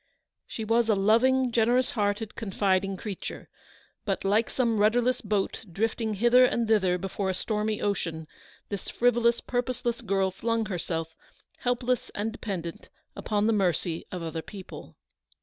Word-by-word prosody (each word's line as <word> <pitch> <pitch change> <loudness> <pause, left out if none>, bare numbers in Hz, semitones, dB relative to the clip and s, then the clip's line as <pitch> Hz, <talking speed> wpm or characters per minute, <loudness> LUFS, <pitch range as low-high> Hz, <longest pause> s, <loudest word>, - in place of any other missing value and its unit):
She 220 - -5
was 230 +1 +2
a 215 - +5
loving, 245 +6 +3
generous 240 +2 +3
hearted, 205 0 -1
confiding 195 -2 0
creature; 205 -3 -6 0.5
but, 195 -3 -2
like 210 +4 +2
some 230 -4 +1
rudderless 240 +4 +3
boat 205 -1 -1
drifting 220 +3 -1
hither 240 +4 +5
and 235 -2 +2
thither 190 -5 +3
before 195 +1 -3
a 190 - 0
stormy 215 +2 -1
ocean, 165 -6 -2 0.4
this 200 -3 -5
frivolous, 235 -1 +2
purposeless 245 -1 -2
girl 190 -1 +1
flung 230 +3 -1
herself, 165 -4 -3 0.5
helpless 245 0 0
and 215 +2 -1
dependent, 185 -7 -6 0.3
upon 210 -1 0
the 225 - +3
mercy 175 -4 0
of 180 -2 -5
other 160 0 -4
people. 195 +2 -10
215 Hz, 140 wpm, -27 LUFS, 195-235 Hz, 0.5 s, a